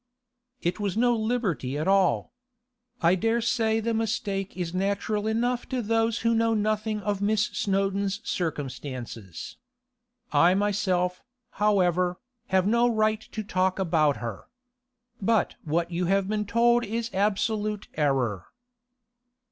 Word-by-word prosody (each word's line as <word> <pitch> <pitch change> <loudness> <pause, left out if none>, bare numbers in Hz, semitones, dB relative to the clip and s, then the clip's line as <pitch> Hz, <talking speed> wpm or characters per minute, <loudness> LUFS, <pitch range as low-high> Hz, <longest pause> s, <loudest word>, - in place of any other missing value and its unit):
'It 175 +4 -1
was 205 -1 -2
no 240 +1 +3
liberty 215 - -1
at 155 - -2
all. 195 -2 +2 0.7
I 170 +2 +5
dare 225 +5 +1
say 225 -1 +1
the 230 +1 -1
mistake 205 -4 -2
is 175 -2 -3
natural 200 +3 -1
enough 240 +2 0
to 260 - -1
those 225 0 +1
who 230 0 +2
know 225 0 +2
nothing 215 0 0
of 205 -1 -2
Miss 210 +1 +2
Snowdon's 195 0 0
circumstances. 130 - -5 0.7
I 175 +2 +5
myself, 190 -3 0 0.4
however, 180 -3 +2 0.3
have 190 -1 +2
no 235 +3 +3
right 215 -1 +1
to 215 - -4
talk 185 -2 0
about 160 -6 +2
her. 115 -5 -6 0.7
But 220 +2 +2
what 170 +3 0
you 175 +1 -1
have 195 +1 +2
been 210 0 -1
told 235 +2 +3
is 230 +2 -3
absolute 210 +1 0
error. 130 - 0
200 Hz, 130 wpm, -26 LUFS, 180-220 Hz, 0.7 s, I